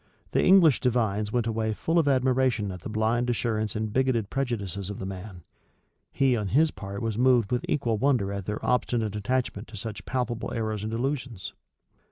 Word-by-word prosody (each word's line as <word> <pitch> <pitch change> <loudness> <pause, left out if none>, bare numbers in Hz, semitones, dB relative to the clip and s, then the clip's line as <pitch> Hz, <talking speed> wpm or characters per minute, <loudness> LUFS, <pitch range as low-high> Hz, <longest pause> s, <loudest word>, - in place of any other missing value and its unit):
The - - +2
English 180 -7 +6
divines 110 -4 0
went 120 -1 +1
away 110 -1 -1
full 165 +8 +1
of 155 - +1
admiration 130 -5 +2
at 90 -2 -8
the - - -6
blind 115 +3 +1
assurance 110 -3 -1
and 110 -1 -2
bigoted 125 -5 +1
prejudices 100 -8 -2
of 100 - -5
the - - -5
man: 95 -2 -8 0.7
he 135 -2 +2
on 105 -3 -2
his 150 +9 +3
part 100 0 -7
was 110 -1 -2
moved 125 -4 +4
with 125 -1 0
equal 120 -7 0
wonder 120 -7 +2
at 100 -2 -5
their 105 0 -3
obstinate 115 -4 0
attachment 120 0 -2
to 110 - -10
such 105 -1 -6
palpable 125 -3 -2
errors 110 -2 -2
and 110 - -3
delusions. 125 -3 -3
115 Hz, 185 wpm, -27 LUFS, 105-125 Hz, 0.7 s, English